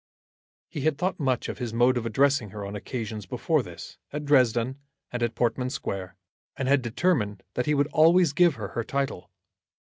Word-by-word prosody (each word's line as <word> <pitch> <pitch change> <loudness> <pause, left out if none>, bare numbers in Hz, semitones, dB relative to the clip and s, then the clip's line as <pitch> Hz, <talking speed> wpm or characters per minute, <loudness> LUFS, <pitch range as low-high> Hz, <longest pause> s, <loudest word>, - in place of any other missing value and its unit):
He 145 - -6
had 155 0 +1
thought 180 +3 -1
much 130 -4 0
of - - -6
his 120 -3 -4
mode 120 +2 +4
of 120 -2 -1
addressing 135 -1 +2
her 100 +1 -7
on 100 +1 -6
occasions 110 -2 -5
before - - +1
this, - - -10
at 150 +1 -4
Dresden 130 -2 +3 0.3
and 120 - -4
at 120 -1 0
Portman 125 +1 0
Square, 95 -8 -5 0.4
and 130 - -2
had 140 0 +4
determined 120 - 0
that 125 - -2
he 150 - +3
would 140 0 +3
always 165 0 +5
give 170 0 +4
her 105 -5 -5
her 115 - -3
title. 135 -7 -3
125 Hz, 185 wpm, -26 LUFS, 110-140 Hz, 0.4 s, always